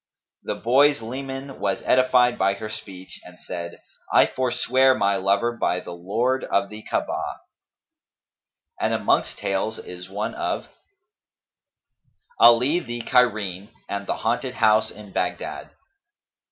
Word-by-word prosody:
The - - -4
boy's 140 +4 +4
leman 135 +3 -6
was 100 -1 -1
edified 125 -1 +3
by 100 +1 +2
her 110 +2 -7
speech 95 -3 -9
and 90 0 -14
said, 85 -1 -7 0.3
'I - - +6
forswear 130 +1 +3
my 100 -3 +1
lover 100 +5 +1
by 90 -5 0
the 90 - -9
lord 115 +9 -1
of 100 0 0
the 105 0 -9
Ka'abah!'" - - -3 1.4
And - - +1
amongst - - +1
tales 100 +3 -2
is 90 0 -9
one 105 +2 -3
of - - -3 1.7
ALI 125 +8 +6
THE 120 -7 -6
CAIRENE 105 -6 +1 0.2
AND 100 0 -4
THE - - -1
HAUNTED 130 -1 -1
HOUSE 110 -2 +3
IN 105 -1 -12
BAGHDAD. - - -3
110 Hz, 125 wpm, -23 LUFS, 100-125 Hz, 1.7 s, I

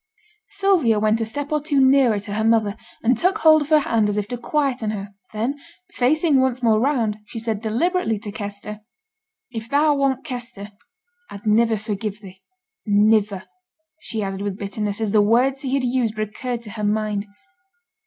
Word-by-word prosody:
Sylvia 390 - +2
went 215 +1 +2
a - - 0
step 285 +6 -5
or 300 -1 +1
two 290 -2 0
nearer 260 -5 +4
to 205 0 -7
her 220 +1 -1
mother, 220 -2 +2 0.3
and 245 +3 +3
took 370 - +1
hold 315 -5 +6
of 295 - -4
her 310 -1 +5
hand 225 -5 +1
as 205 - -2
if 205 -1 -1
to 245 - -3
quieten 255 -2 -1
her; 205 -1 -5 0.2
then 235 +7 -2 0.3
facing 295 +3 +2
once 260 -1 0
more 220 -2 +4
round, 230 -5 0
she 230 - -9
said 220 -2 -3
deliberately 235 - 0
to 205 0 -7
Kester, 205 0 -7 0.7
'If 225 -1 -6
thou 295 +2 +3
wasn't 275 -2 0
Kester, 240 -6 -7 0.6
I'd 200 +1 -10
niver 225 +1 +3
forgive 210 -1 -4
thee. 190 -2 -13 0.5
Niver,' 205 -1 +3 0.5
she 225 -8 -4
added, 195 0 -4
with 200 -1 -3
bitterness, 205 +1 -3
as 215 -2 0
the 210 0 +5
words 250 +6 +2
he 270 -1 -1
had 275 - 0
used 240 -3 0
recurred 230 +3 -4
to 210 - -7
her 210 0 -6
mind. 210 -1 -1
225 Hz, 180 wpm, -22 LUFS, 210-265 Hz, 0.7 s, hold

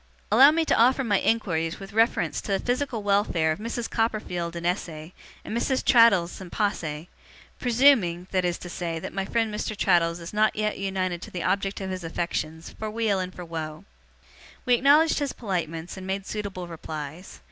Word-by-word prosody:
Allow 275 +2 +8
me 325 +1 +1
to - - +2
offer 255 +4 +4
my 205 -5 +2
inquiries 170 -7 0
with 195 0 -10
reference 225 +2 +1
to - - -5
the 195 - +1
physical 245 -2 -2
welfare 200 -6 +2
of 155 - -3
Mrs. 230 +1 -3
Copperfield 180 -7 -2
in 170 0 -5
esse, 180 0 0 0.6
and - - -4
Mrs. 260 +2 0
Traddles 215 -9 +5
in 185 - -8
posse, 165 -7 -2 0.5
presuming, 230 -9 +3
that 185 -1 +1
is 175 -1 0
to - - -9
say, 170 -1 -4
that 160 - -6
my 195 0 -2
friend 225 0 0
Mr. 215 0 -3
Traddles 170 -3 +2
is 170 +3 -8
not 215 +1 +2
yet 210 -1 -1
united 185 -3 -2
to - - -8
the 180 - -5
object 195 +1 0
of 190 -1 -4
his 185 -1 -5
affections, 165 -1 -4
for 220 - -3
weal 215 -3 0
and 185 0 -3
for 180 -1 -9
woe.' 160 +1 -6 0.8
We 250 - +3
acknowledged 290 +7 +5
his 285 -2 -2
politeness, 170 -5 -4
and 190 0 -8
made 195 0 -2
suitable 200 -4 -5
replies. 160 +1 -8
195 Hz, 190 wpm, -26 LUFS, 170-225 Hz, 0.8 s, Allow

